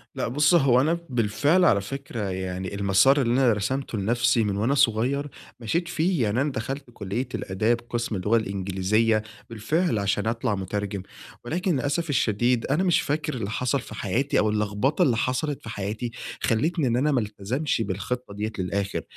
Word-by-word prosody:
لأ، - - -1
بُص 145 +7 +3
هو 135 -6 +5
أنا 165 +4 +1
بالفعل 125 - +2
على 100 -9 +4
فكرة 115 -3 -5
يعني 95 +1 -4
المسار 100 +8 +4
اللي 120 -1 +1
أنا 125 -3 +4
رسمته 120 +3 -2
لنفسي 120 +3 +2
من 100 -1 -1
وأنا 125 +7 +1
صغيّر 135 +3 +2 0.3
مشيت 165 +10 -1
فيه، 175 -4 +1
يعني 110 +5 +1
أنا 145 0 0
دخلت 135 +4 -4
كلية 115 +6 -3
الآداب 110 +5 0
قسم 120 -2 -2
اللغة 105 +5 +2
الإنجليزية 100 +2 +1 0.3
بالفعل 115 - 0
عشان 100 +2 0
أطلع 115 -2 0
مترجم، 100 0 -3 0.4
ولكن 175 +6 0
للأسف 145 +5 -1
الشديد 120 -1 +1
أنا 150 +7 +1
مش 180 -3 +3
فاكر 150 0 -2
اللي 110 -5 -3
حصل 125 +4 0
في 110 - -10
حياتي 120 +9 0
أو 105 - +2
اللخبطة 105 +7 0
اللي 120 -4 +2
حصلت 130 +4 -1
في - - -9
حياتي، 110 +3 -4 0.3
خليتني 145 +5 +1
إن 120 - +1
أنا 150 +4 +2
ما 130 - +2
التزمش 110 +7 -2
بالخطّة 105 +3 -3
دِيَّة 105 +2 -3
للآخر، 100 +2 -2
115 Hz, 170 wpm, -25 LUFS, 105-140 Hz, 0.4 s, هو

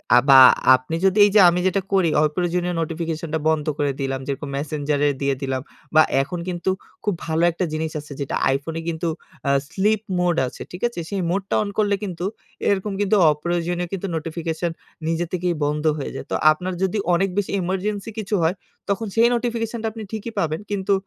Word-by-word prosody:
আ - - +8
বা 135 -1 +10 0.3
আপনি 130 +6 -4
যদি 195 +2 +3
এইযে 205 +1 +4
আমি 175 +1 0
যেটা 190 +1 +1
করি 185 -4 +4
অপ্রয়োজনীয় 175 +3 0
নোটিফিকেশনটা 160 -1 -3
বন্ধ 155 -2 +1
করে 145 -1 +1
দিলাম, 135 -1 -2
যেরকম 140 +1 -4
মেসেঞ্জারে 145 0 0
দিয়ে 140 -1 +1
দিলাম। 130 -1 -2 0.3
বা 155 - +9 0.2
এখন 170 +5 -4
কিন্তু 175 +1 -2 0.3
খুব 205 - +1
ভালো 160 +1 0
একটা 175 +2 -2
জিনিস 155 0 -2
আছে 145 -1 -9
যেটা 140 - -2
আইফোনে 145 +5 -2
কিন্তু 165 +1 -2 0.4
আ - - +4 0.2
স্লিপ 210 +3 +1 0.2
মোড 175 -2 +2
আছে, - - -10
ঠিক 180 - -8
আছে? 235 -7 -7
সেই 200 -2 -2
মোডটা 195 +2 -1
অন 205 - -4
করলে 205 -2 +2
কিন্তু 180 -3 -4 0.4
এরকম 200 +1 0
কিন্তু 205 +1 +2 0.2
অপ্রয়োজনীয় 175 +3 -2
কিন্তু 195 +1 -3
নোটিফিকেশন 165 +1 -3 0.4
নিজে 165 +1 0
থেকেই 180 -1 0
বন্ধ 150 +1 -1
হয়ে 140 - -4
যায়। - - -6
তো - - +1 0.2
আপনার 180 +4 -3
যদি 190 +3 0 0.2
অনেক 190 +3 +2
বেশি 205 - 0
emergency 195 +4 -2
কিছু 210 0 -1
হয় 170 +4 +2 0.3
তখন 210 +3 -1
সেই 230 +1 +6
নোটিফিকেশনটা 230 -1 -2
আপনি 220 0 -8
ঠিকই 220 +1 -5
পাবেন। 155 0 -1
কিন্তু 200 0 +1
175 Hz, 180 wpm, -22 LUFS, 155-195 Hz, 0.4 s, বা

